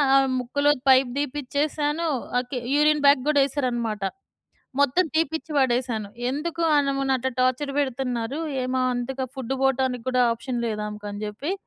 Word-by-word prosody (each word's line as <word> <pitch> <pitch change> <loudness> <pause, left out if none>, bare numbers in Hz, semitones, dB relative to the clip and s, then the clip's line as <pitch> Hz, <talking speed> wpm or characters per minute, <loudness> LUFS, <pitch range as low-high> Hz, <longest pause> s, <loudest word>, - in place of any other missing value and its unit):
ఆమె 270 0 +5
ముక్కులో 285 +4 +1 0.2
pipe 260 -1 +5
తీపిచ్చేసాను, 295 +3 -1 0.3
okay. 250 +1 -4 0.2
Urine 300 0 +3
bag 280 -2 +6
కూడా 290 -2 +4
ఎసారనమాట. 240 -7 -2 0.8
మొత్తం 285 +6 +3
తీపిచ్చి 320 0 -1
వడేశాను. 240 -5 +1 0.2
ఎందుకు 330 +4 -3 0.2
ఆనెమేని 275 -1 +1
అట్లా 260 +1 -2
టార్చర్ 255 +3 +1
పెడుతున్నారు. 260 -1 -2 0.2
ఏమో 255 +1 -1 0.2
అంతగా 260 +2 -3
ఫుడ్ 265 0 -3
పోటానికి 260 -2 +1
కూడా 255 -1 +2
ఆప్షన్ 240 +1 -4
లేదామెకని 210 -1 -4
చెప్పి, 215 - -4
265 Hz, 130 wpm, -24 LUFS, 245-285 Hz, 0.8 s, bag